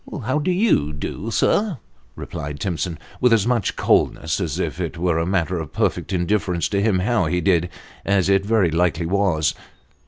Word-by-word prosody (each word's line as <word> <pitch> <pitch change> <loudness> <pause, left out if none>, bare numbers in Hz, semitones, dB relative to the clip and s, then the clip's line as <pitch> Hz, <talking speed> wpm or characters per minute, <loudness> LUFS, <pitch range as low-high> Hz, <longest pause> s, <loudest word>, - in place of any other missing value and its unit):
" - - -13
How 130 +5 +1
do 155 - -1
you 180 - +2
do, 85 +8 -5
sir? 200 - +1 0.2
" - - -35
replied 75 -3 -6
Timson, 85 -2 -2 0.2
with 125 - +3
as 110 -3 +4
much 120 -4 0
coldness - - +1
as - - -2
if - - -3
it - - -4
were 85 -1 +1
a 85 - -1
matter 90 -2 0
of 80 -3 -7
perfect - - -1
indifference 90 -1 0
to 100 -1 0
him 105 -2 +2
how 100 +1 +1
he 90 +3 0
did, 90 -1 +2 0.3
as 100 -2 +2
it 100 0 +3
very 100 -5 +2
likely 85 0 +1
was. 90 -5 +1
95 Hz, 190 wpm, -21 LUFS, 85-105 Hz, 0.3 s, as